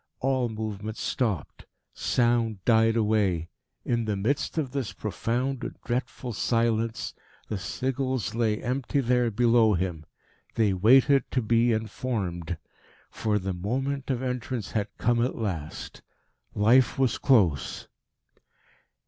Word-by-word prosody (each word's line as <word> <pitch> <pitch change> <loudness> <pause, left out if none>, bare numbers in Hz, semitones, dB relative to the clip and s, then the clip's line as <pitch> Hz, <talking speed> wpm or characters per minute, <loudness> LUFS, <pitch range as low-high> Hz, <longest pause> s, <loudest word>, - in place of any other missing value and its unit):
All 130 -2 +1
movement 110 -1 -5
stopped. 110 - -2 0.3
Sound 115 -5 +1
died 115 -1 +4
away. 105 -7 +1 0.4
In 115 -1 0
the 105 -1 -1
midst 120 +12 -1
of 140 -5 -1
this 135 -5 -3
profound 120 +4 -2
and - - -5
dreadful 125 0 -3
silence 115 0 0 0.4
the 105 - -2
sigils 130 +2 -2
lay 110 -2 0
empty 130 +3 -1
there 125 -2 +2
below 115 -1 +4
him. 85 -4 -3 0.5
They 105 -4 +3
waited 130 +7 +5
to 130 - +1
be 115 +2 +3
in 110 0 0
formed. 90 -9 -3 0.5
For 105 -2 0
the 95 -1 -2
moment 135 +9 -2
of 130 -1 -1
entrance 125 -3 -3
had 105 -2 -1
come 120 0 +2
at 125 - -1
last. 90 -9 -5 0.5
Life 115 +4 +4
was 130 -3 +1
close. 95 - +2
115 Hz, 125 wpm, -27 LUFS, 105-125 Hz, 0.5 s, waited